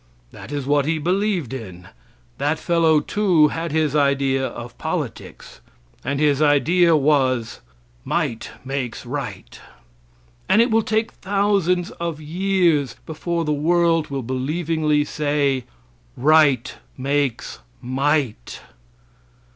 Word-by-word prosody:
That - - -11
is 145 -2 -3
what 145 0 +2
he 160 0 +1
believed 180 - -1
in. 90 -8 -8 0.5
That 150 +2 0
fellow, 160 -2 +2
too, 175 -4 +3
had 165 0 -4
his 155 -2 0
idea 140 -2 +2
of 120 0 -9
politics, - - -5 0.4
and 140 +2 -2
his 145 -1 +2
idea 165 +4 +4
was, 135 -5 +1 0.4
"Might 115 - -2 0.2
makes 135 -3 -4
right." - - -6 0.9
And 215 - +5
it 235 +1 +4
will 225 +1 +4
take 220 +1 -1
thousands 195 -3 0
of 170 -3 -3
years 170 -4 +1
before 165 +1 -3
the 150 - 0
world 165 +1 +2
will 135 -2 -3
believingly 150 +4 0
say, 145 -4 0 0.5
"Right 145 -2 +3 0.2
makes 140 -1 -2 0.2
might." 135 - -1
150 Hz, 115 wpm, -21 LUFS, 135-170 Hz, 0.9 s, And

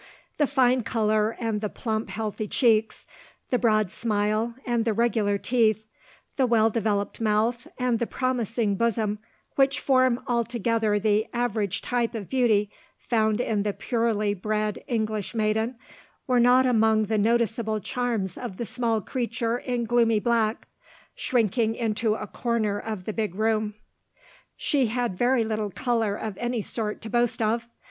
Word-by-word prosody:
The 295 - +4
fine 255 -2 +3
colour 215 0 0
and 225 -3 -1
the 210 - -2
plump 220 0 -3
healthy 215 -1 -3
cheeks, 220 -2 +2 0.5
the 250 - +2
broad 215 -5 +2
smile, 215 +1 0
and 240 -2 +1
the 225 -1 +1
regular 220 -3 +1
teeth, 220 -1 +1 0.5
the 265 -2 +3
well 225 -1 +3
developed 210 -2 -1
mouth, 225 +2 +1
and 250 -2 +1
the 235 - -1
promising 235 -4 -1
bosom 215 -1 0 0.4
which 275 0 +3
form 255 -2 +3
altogether 230 -3 0
the 210 +1 +1
average 220 -5 -1
type 240 -1 -1
of 205 -5 -6
beauty 220 -6 +2 0.3
found 220 -2 +1
in 220 -4 0
the 205 0 -1
purely 225 -4 0
bred 210 +1 -2
English 220 -4 -2
maiden, 220 +2 0 0.5
were 250 -2 +2
not 250 +2 +5
among 220 -3 +3
the 215 +1 0
noticeable 225 0 +1
charms 225 -5 -2
of 235 -7 -6
the 235 - -3
small 230 -2 0
creature 235 +1 -2
in 245 -2 -2
gloomy 230 -2 +3
black, 230 0 0 0.5
shrinking 225 -1 +1
into 220 -1 0
a 210 - -5
corner 215 -2 -1
of 215 -5 -5
the 215 - -3
big 215 -5 -2
room. 215 0 0 0.8
She 275 -5 +1
had 240 -3 -1
very 245 +3 +2
little 215 -1 -2
colour 225 -1 0
of 210 -2 -5
any 240 -2 -1
sort 215 0 -4
to 220 - -5
boast 240 -1 +1
of. 230 +1 0
225 Hz, 150 wpm, -26 LUFS, 215-240 Hz, 0.8 s, not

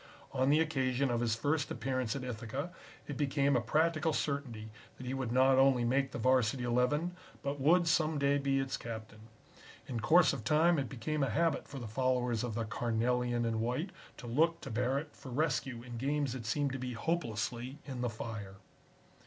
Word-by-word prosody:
On 130 0 +1
the 150 +2 +5
occasion 135 -4 +1
of 120 - +1
his 115 -2 +1
first 145 +6 0
appearance 125 0 -2
at 135 - -4
Ithaca 125 +6 -4 0.4
it 145 - -5
became 140 -1 +2
a 120 - +3
practical 155 +5 +1
certainty 125 -8 -3 0.3
that 130 - -8
he 125 - -3
would 130 -3 -2
not 130 +1 +5
only 135 -2 +5
make 135 +3 +2
the - - -6
Varsity 125 0 +2
Eleven, 125 +9 +1 0.3
but 140 +1 -2
would 170 +5 +4
some 160 -1 +2
day 140 0 +2
be 135 -1 +1
its 135 0 -1
captain. 110 -2 -7 0.7
In 120 -3 -3
course 160 +9 +5
of 130 -5 -5
time 160 +5 +4
it 135 - -2
became 145 +4 -2
a 135 - +2
habit 165 -2 +1
for 140 - -8
the 120 - -5
followers 125 0 0
of 120 -3 -3
the 115 0 -1
Carnelian 120 +1 0
and 115 -1 0
White 125 - -1 0.3
to - - -9
look 160 +8 +2
to 135 - -7
Barrett 130 +6 -1
for 130 - -10
rescue 135 -3 -1
in 120 -1 -7
games 140 0 0
that 120 -4 -6
seemed 140 +5 0
to 135 - -4
be 125 0 -4
hopelessly 120 -3 -2
in 130 -3 -5
the 125 - 0
fire. 110 -3 -6
130 Hz, 195 wpm, -33 LUFS, 120-145 Hz, 0.7 s, the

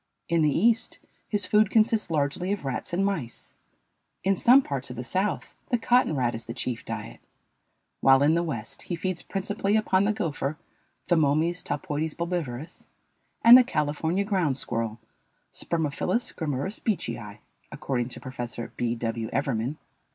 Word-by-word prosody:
In 170 -1 +3
the 150 - +4
East, 225 - +2 0.3
his 205 -3 0
food 210 +1 +4
consists 220 -2 +2
largely 155 +4 0
of 200 -7 -3
rats 135 +7 -3
and 185 +3 +1
mice; 155 -13 -4 0.7
in 195 +2 +3
some 255 +8 +6
parts 140 - -3
of 125 - -7
the 125 - -5
South 190 - -2 0.2
the 245 - +2
cotton 240 -6 +3
rat 120 -3 +1
is 115 0 -6
the 115 - -6
chief 120 -2 -3
diet; - - -6 0.8
while 135 +1 +6
in 150 +2 +4
the 170 - +2
West 135 -10 -5
he 175 - 0
feeds 180 +1 -3
principally 200 +1 -1
upon 195 -2 +2
the 210 - +3
gopher 155 -8 -2 0.5
(Thomomys 165 +1 +2
talpoides 155 -3 -3
bulbivorus) 165 -5 -4 0.6
and 235 +1 +11
the 255 - +9
California 160 - 0
ground 185 -10 0
squirrel 115 -4 -3 0.6
(Spermophilus 170 +8 -1
grammurus 155 - -3
beecheyi), 115 - -3 0.3
according 130 -5 -2
to - - -6
Prof. 120 -2 -6
B. 120 -1 -1
W. 115 -1 -3
Evermann. 135 0 -1
160 Hz, 150 wpm, -26 LUFS, 130-195 Hz, 0.8 s, and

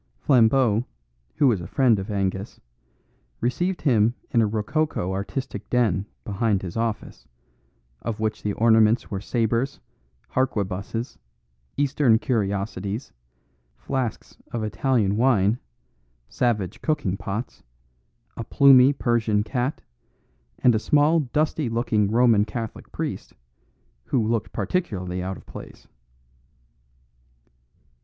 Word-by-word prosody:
Flambeau, 120 - +3 0.5
who - - +2
was 110 -8 +2
a 85 - -7
friend 125 -3 +3
of 95 +3 -6
Angus, 100 -1 -2 0.8
received 175 +10 -1
him 120 -4 +3 0.2
in 120 -5 +3
a 110 - +3
rococo 105 - -1
artistic 130 +8 -5
den 110 -5 +1 0.2
behind 100 -1 0
his 90 -2 -6
office, 115 -1 -3 0.7
of 115 -2 -4
which 110 -1 -2
the 105 - -2
ornaments 110 +1 +3
were 95 -2 -3
sabres, 115 +4 -1 0.5
harquebuses, 115 -2 -2 0.6
Eastern 140 -4 +3
curiosities, 100 - -2 0.6
flasks 130 -5 -4 0.2
of 115 -2 -3
Italian 105 -1 +1
wine, 115 -3 +3 0.7
savage 110 -7 -1
cooking 145 - 0
pots, 105 +5 -5 0.7
a 115 - -5
plumy 135 +2 +6
Persian 115 -5 +1
cat, 125 +5 -2 0.7
and 125 - +4
a 110 - +2
small 150 +6 +3
dusty 150 0 -1
looking 115 -3 +1
Roman 115 -2 +4
Catholic 110 +1 -6
priest, - - -5 0.7
who 115 -5 0
looked 115 -2 -1
particularly 95 - -2
out 95 +1 -4
of - - -16
place. - - -11
115 Hz, 110 wpm, -24 LUFS, 105-130 Hz, 0.8 s, plumy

